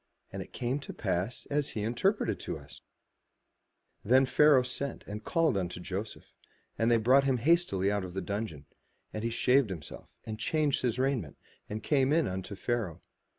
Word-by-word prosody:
And - - -4
it - - -9
came 125 +3 -2
to 140 - -8
pass, 95 +3 -2
as 145 0 +1
he 105 - -1
interpreted 120 - +1
to - - -4
us/' - - -12 1.2
Then 130 +5 +5
Pharaoh 145 -1 +5
sent 130 +1 -4
and 105 +1 -6
called 165 - +2 0.2
Joseph, 95 +4 -6 0.4
and 115 +1 +1
they 120 - +5
brought 130 +5 +4
him 135 -2 +2
hastily 120 - +2
out 100 -1 0
of 90 0 -7
the - - 0
dungeon: 95 -6 -4 0.5
and 110 - -4
he 115 - 0
shaved 125 +1 +3
himself, 85 -6 -8 0.2
and 110 -1 -5
changed 150 +4 +1
his 120 -2 0
raiment, 130 - -1 0.3
and 110 +1 -5
came 135 -2 +2
in 160 +1 +3
unto 95 +2 -4
Pharaoh. 100 -4 -2
115 Hz, 170 wpm, -30 LUFS, 100-135 Hz, 1.2 s, Then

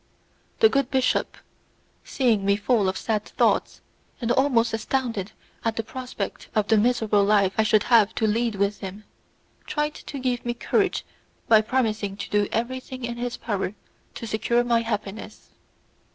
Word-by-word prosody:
The 445 - +9
good 275 - +1
bishop, 260 -1 0 0.7
seeing 235 -7 +1
me 200 0 +3
full 205 -1 +2
of 185 - -3
sad 215 -2 -1
thoughts, - - 0 0.4
and 235 -3 -1
almost 240 -3 +2
astounded 225 -3 -2 0.3
at 225 -1 0
the 225 - -2
prospect 245 -3 -6
of 210 -1 +2
the 220 - +5
miserable 220 -3 +2
life 200 -2 +3
I - - +3
should 215 -1 +3
have 225 -4 +4
to 220 - +1
lead 225 +1 +1
with 200 +1 0
him, 195 +2 -7 0.6
tried 300 0 -1
to 285 - -8
give 250 -2 -1
me 240 0 -2
courage - - 0 0.4
by 220 -1 +6
promising 215 -4 -1
to 205 - -6
do 205 -1 +2
everything 255 +2 -3
in 235 0 -5
his 245 0 -3
power 205 -3 -3 0.4
to - - -6
secure 235 +2 +1
my 235 -1 +2
happiness. 215 -2 -5
225 Hz, 160 wpm, -24 LUFS, 210-245 Hz, 0.7 s, The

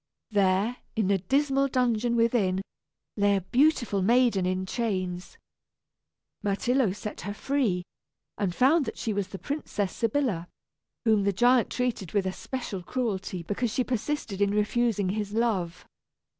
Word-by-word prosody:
There, 200 +4 +2 0.2
in 210 -4 +1
a 195 - +3
dismal 275 +7 +2
dungeon 240 -3 +1
within, 220 -5 +2 0.5
lay 200 0 +3
a 195 - 0
beautiful 240 - +2
maiden 230 -3 +3
in 185 0 -1
chains. 185 -5 -3 1.0
Myrtillo 225 +3 +1
set 210 +2 -6
her 205 +3 -5
free, 230 -10 0 0.5
and 190 -4 -2
found 280 +4 +4
that 225 - -5
she 220 - -2
was 200 -2 -1
the 195 - -7
Princess 210 -8 -3
Sybilla, 230 -7 0 0.6
whom 215 -3 +4
the 200 - +2
giant 240 +4 +4
treated 240 -8 -2
with 200 -2 +1
especial 195 +1 -4
cruelty 190 -4 -3
because 210 +6 -2
she 255 - +1
persisted 245 -4 -3
in 200 0 +2
refusing 210 -2 +1
his 205 +1 -3
love. 205 -7 -1
210 Hz, 140 wpm, -27 LUFS, 190-245 Hz, 1.0 s, found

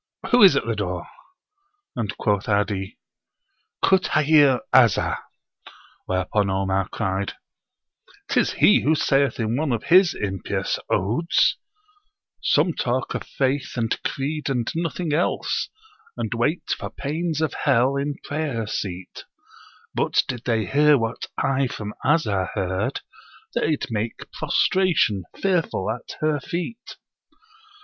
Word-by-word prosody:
Who 245 - +5
is 190 -8 +8
at - - 0
the 115 -1 -1
door?" 90 -4 -3 0.9
And 105 -3 -3
quoth 105 0 0
'Adi, 100 -1 -1 0.9
"Kutthayir 155 -7 +4
'Azzah": 120 -6 +4 0.9
whereupon 95 +2 0
Omar 95 0 0
cried, 95 -2 -2 0.9
"'Tis - - +1
he - - +5
who 155 +5 +3
saith 135 -4 +1
in 115 0 0
one 150 -1 0
of 115 -2 -1
his 185 -3 +6
[impious] 95 -3 -2
Odes: 120 - +2 0.9
'Some 175 - +2
talk 130 -1 -1
of - - -3
faith 135 0 -1
and 115 -2 0
creed 145 +2 -2
and 125 -4 -1
nothing 165 -1 -2
else, 165 +4 0 0.5
And - - -2
wait - - -1
for - - -6
pains 160 +2 -3
of 160 -1 0
Hell 130 0 +2
in 140 +1 -2
prayer 145 -7 -2
seat; 95 -4 -5 0.7
But - - +2
did 125 -2 -5
they 115 -3 +1
hear 150 +1 +4
what 115 -2 -3
I 135 0 +1
from 105 -3 -6
Azzah 110 - +1
heard, 95 -2 -2 0.5
They'd 155 -2 0
make 110 +1 -4
prostration, 165 - +1
fearful, 175 - 0
at 120 +2 -7
her 155 -1 +1
feet.' 180 - -5
130 Hz, 125 wpm, -23 LUFS, 105-155 Hz, 0.9 s, is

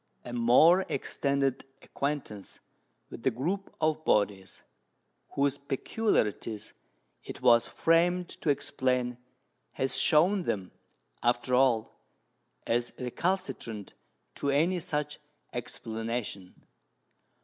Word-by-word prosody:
A 120 - -7
more 130 +10 +5
extended 140 -1 0 0.2
acquaintance 140 -8 -4 0.5
with - - -8
the 130 - +3
group 170 - -3
of 155 0 +1
bodies 100 -5 0 0.7
whose 140 0 +1
peculiarities 130 - -1 0.5
it - - -9
was 115 0 +6
framed 175 +2 +2
to 155 - -4
explain 130 -4 0 0.5
has 130 - 0
shown 180 +5 +4
them, 95 -3 -2 0.5
after 120 +1 +1
all, 125 -4 +2 0.7
as 120 +1 0
recalcitrant 125 - -3 0.4
to 140 - -2
any 165 +6 +2
such 150 -2 -3 0.3
explanation. 115 -4 -4
130 Hz, 95 wpm, -29 LUFS, 115-155 Hz, 0.7 s, was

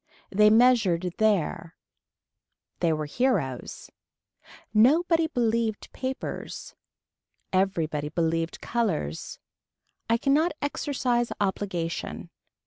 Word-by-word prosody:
They 210 +2 +5
measured 220 -7 +4
there. 180 -5 +1 1.0
They 170 -2 +2
were 155 -1 -1
heroes. 145 - -2 0.8
Nobody 320 +9 +4
believed 230 -6 -1
papers. 260 0 -5 0.8
Everybody 160 -6 0
believed 165 0 -1
colors. 175 - -2 0.7
I 230 - +4
cannot 290 +7 +2
exercise 255 -4 -1
obligation. 190 -4 -3
210 Hz, 75 wpm, -26 LUFS, 165-250 Hz, 1.0 s, They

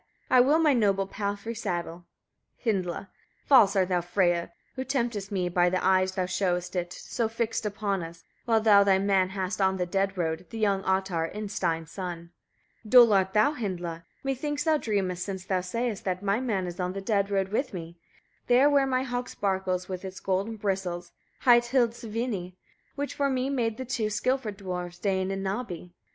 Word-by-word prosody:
7. - - +5
I - - +9
will 285 +5 +4
my 315 -3 +4
noble 200 -5 +2
palfrey 205 +3 -4
saddle. 175 -6 -4 0.6
Hyndla. 185 -6 0 0.4
8. - - -38
False 220 -8 +6
are 190 -1 +4
thou, 180 -1 0
Freyia! 175 -1 +1 0.3
who 260 - -3
temptest 235 -7 -2
me: 185 -3 0
by 175 0 +3
thy 185 - 0
eyes 185 0 +2
thou 185 -1 -1
showest 180 -1 -1
it, 175 -1 -2
so 230 +5 -3
fixed 225 -1 -2
upon 200 -2 -2
us; 165 0 -9 0.2
while 225 -2 +3
thou 210 -2 +6
thy 195 -1 +4
man 190 -1 +2
hast 190 0 -3
on 190 0 +2
the 180 - 0
dead 195 +2 -1
road, 160 0 -2
the 230 - -7
young 200 -3 +1
Ottar, 190 -4 0
Innstein's 175 -6 -2
son. 175 -3 -6 0.5
9. 215 - -12
Dull 240 -3 +8
art 190 -1 +2
thou, 215 +8 +4
Hyndla! 175 - -4 0.2
methinks 290 +2 -2
thou 315 -1 +3
dreamest, 190 -6 -1
since 190 -1 -5
thou 190 -2 0
sayest 230 +3 -3
that 185 0 -2
my 200 +2 +1
man 215 -8 -1
is 175 0 -7
on 180 0 -1
the 195 - -5
dead 200 0 +1
road 195 -1 0
with 255 +6 -1
me; 170 -2 -7 0.5
there 250 +3 +5
where 280 -1 +4
my 255 -1 +1
hog 245 -1 -3
sparkles 190 -2 -1
with 185 -1 -5
its 190 0 -7
golden 195 +4 -1
bristles, 190 -4 -3 0.3
hight 240 -2 +6
Hildisvini, 230 -6 -1 0.4
which 285 0 -3
for 280 -1 0
me 260 +1 0
made 230 -5 -1
the 260 - -5
two 225 -3 -1
skilful 235 +2 0
dwarfs, 180 -3 -6
Dain 190 0 0
and 195 0 -3
Nabbi. 190 -4 -4
195 Hz, 190 wpm, -27 LUFS, 180-230 Hz, 0.6 s, I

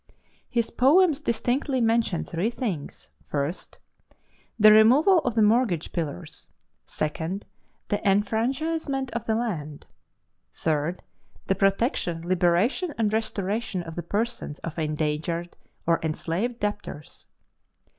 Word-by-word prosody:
His 235 -2 0
poems 310 +3 +4
distinctly 255 +2 0
mention 225 -6 +1
three 175 +7 -1
things: 215 - -5 0.2
1. 145 +2 0 1.0
The 215 -1 +8
removal 260 - +6
of 245 -7 -2
the 220 - +4
mortgage 210 -6 +2
pillars. 145 - -5 0.4
2. 160 +5 -3 0.5
The 205 - 0
enfranchisement 265 +8 0
of 230 0 -4
the 220 - +1
land. 160 -11 -3 0.7
3. 155 +4 0 0.5
The - - +2
protection, 195 - 0
liberation, 185 - +2
and 215 -2 +1
restoration 210 -3 -1
of 165 -1 -8
the 175 - -3
persons 220 -6 -3
of 165 0 -5
endangered 155 +2 -2 0.3
or 165 0 +3
enslaved 170 +9 -2
debtors. 205 -8 -5
210 Hz, 110 wpm, -26 LUFS, 165-240 Hz, 1.0 s, The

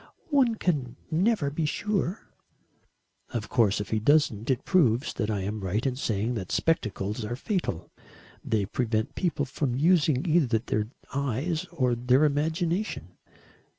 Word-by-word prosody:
"One 260 -5 +4
can 140 - -1 0.2
never 170 -3 +2
be 150 +1 -1
sure." 200 +2 -2 1.0
"Of 110 -3 -4
course 110 -5 +3
if 105 - -5
he 110 - +2
doesn't, 115 -3 +2
it 130 -3 0
proves 135 - +3
that 105 -2 -2
I 105 -2 -1
am 105 +3 -3
right 95 +3 -2
in 130 -2 0
saying 115 -2 -1
that 95 -6 -5
spectacles 110 - 0
are 120 +3 -3
fatal. 140 - -3 0.5
They 110 -3 0
prevent 110 +1 -1
people 165 -6 -1
from 130 -1 -2
using 155 -1 +3
either 150 -8 +3
their 105 -2 -2 0.3
eyes 140 +5 -1
or 130 -8 0
their 125 +4 +3
imagination. 165 +7 -1
130 Hz, 145 wpm, -27 LUFS, 110-165 Hz, 1.0 s, One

